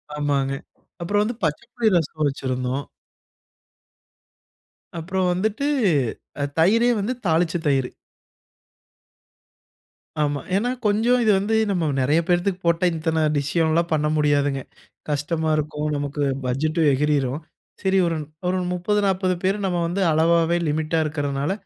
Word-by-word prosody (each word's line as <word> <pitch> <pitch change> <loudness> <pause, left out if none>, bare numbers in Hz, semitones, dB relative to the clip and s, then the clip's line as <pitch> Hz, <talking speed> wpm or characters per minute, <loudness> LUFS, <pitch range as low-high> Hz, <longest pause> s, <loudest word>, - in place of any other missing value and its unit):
ஆமாங்க. 140 -2 0 0.5
அப்புறம் 205 +4 +1
வந்து 230 +2 -3
பச்சப்புளி 235 +9 -1
ரசம் 155 -1 -1
வச்சிருந்தோம். 130 0 -3 2.2
அப்புறம் 185 +2 -1
வந்துட்டு 220 +9 -1 0.9
தயிரே 230 +8 +4
வந்து 220 +6 -1
தாளிச்ச 165 0 +2
தயிர். 135 -3 +1 2.3
ஆமா. 145 -1 0 0.2
ஏன்னா 235 +5 +1 0.2
கொஞ்சம் 225 +4 +3
இது 215 - +4
வந்து 205 +3 -1 0.2
நம்ம 180 -4 0 0.2
நெறைய 145 +5 +3
பேரத்துக்கு 180 +1 +1
போட்டா 170 +1 +2
இத்தனை 160 0 -1
டிஷ்லாம் 160 +3 +1
பண்ண 150 -1 +1
முடியாதுங்க. 145 -2 +1 0.5
கஷ்டமா 155 +2 -1
இருக்கும். 150 0 -2
நமக்கு 145 0 -2 0.2
பட்ஜெட்டும் 155 +5 +1
எகிறிரும். 145 0 0 0.4
சரி 190 0 +2
ஒரு 165 - -1 0.3
ஒரு 185 +1 +1 0.2
30-40 190 0 +1
பேர் 195 +2 +1
நம்ம 180 -2 0
வந்து 180 +4 -2
அளவாவே 165 +2 +3
லிமிட்டா 155 +2 0
இருக்கிறனால, 145 0 -2
160 Hz, 110 wpm, -23 LUFS, 145-190 Hz, 2.3 s, தயிரே